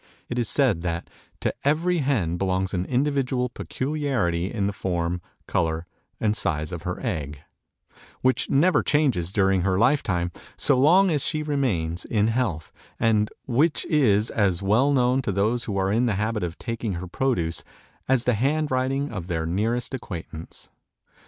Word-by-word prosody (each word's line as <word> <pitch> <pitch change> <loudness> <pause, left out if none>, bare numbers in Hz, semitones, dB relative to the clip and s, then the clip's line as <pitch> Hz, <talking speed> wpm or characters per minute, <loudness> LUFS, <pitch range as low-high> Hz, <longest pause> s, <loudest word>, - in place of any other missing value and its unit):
It 125 - -2
is 115 - 0
said 125 - +2
that 85 -1 -3 0.3
"to - - 0
every 165 +5 +2
hen 110 - 0
belongs 95 +1 0
an 90 -1 -1
individual 130 -1 0
peculiarity 125 - -1
in 100 -4 -1
the 100 - -1
form, 90 -2 -2 0.2
color, 80 0 -1 0.3
and 110 -1 +1
size 80 -6 -1
of 90 -2 -5
her 90 +1 -4
egg, 75 -3 -3 0.8
which 130 0 +1
never 170 +7 +4
changes 125 - +1
during 95 -2 +2
her 95 0 +1
life 130 +7 +4
time, 90 -3 -1 0.3
so 140 - +3
long 175 +9 +5
as 150 -4 0
she 155 -1 -1
remains 105 - -1
in 110 -1 +1
health, 110 - -1 0.3
and 110 -2 +2 0.2
which 145 +6 +1
is 110 -8 +3
as 100 -4 +1
well 115 +9 +3
known 130 -1 +3
to 105 - -2
those 110 +5 0
who 100 -3 -3
are 95 0 +1
in 120 +4 +2
the 110 - +1
habit 105 +2 -1
of 85 -2 -4
taking 115 -3 -3
her 85 +1 -4
produce, 90 -6 -1 0.5
as 130 -3 +3
the 125 - +2
hand 145 +7 0
writing 135 +2 0
of 95 -5 -5
their 80 -3 -1
nearest 110 +10 -1
acquaintance." 85 -9 -7
110 Hz, 165 wpm, -25 LUFS, 90-130 Hz, 0.8 s, long